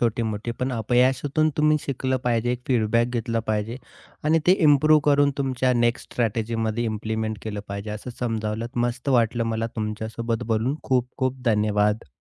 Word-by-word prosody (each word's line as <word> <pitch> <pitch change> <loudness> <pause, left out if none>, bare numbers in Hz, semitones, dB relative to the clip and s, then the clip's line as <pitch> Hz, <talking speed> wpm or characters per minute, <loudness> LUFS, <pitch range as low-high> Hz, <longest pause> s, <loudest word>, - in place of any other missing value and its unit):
छोटी-मोठी, 115 -1 -1
पण 130 0 -1
अपयशातून 130 +6 +2
तुम्ही 155 0 +4
शिकलं 130 -1 -1
पाहिजे 120 0 +1
एक 125 - -4
फीडबॅक 115 -1 +2
घेतलं 115 -1 -1
पाहिजे. 110 +2 -1 0.5
आणि 160 +2 +4
ते 180 - +7 0.2
इम्प्रूव्ह 155 +2 +5
करून 145 -1 +4
तुमच्या 130 -2 +1
नेक्स्ट 120 0 0
स्ट्रॅटेजीमध्ये 115 0 -1
इम्प्लिमेंट 110 0 -2
केलं 105 -2 -4
पाहिजे, 100 +1 -5
असं 105 +4 -6
समजावलंत. 110 -1 -2 0.2
मस्त 125 +3 -4
वाटलं 120 -2 +2
मला 115 +1 -1
तुमच्यासोबत 110 +2 -3
बोलून 115 +5 +1
खूप-खूप 130 +1 -1
धन्यवाद! 105 - +1
115 Hz, 140 wpm, -24 LUFS, 110-130 Hz, 0.5 s, ते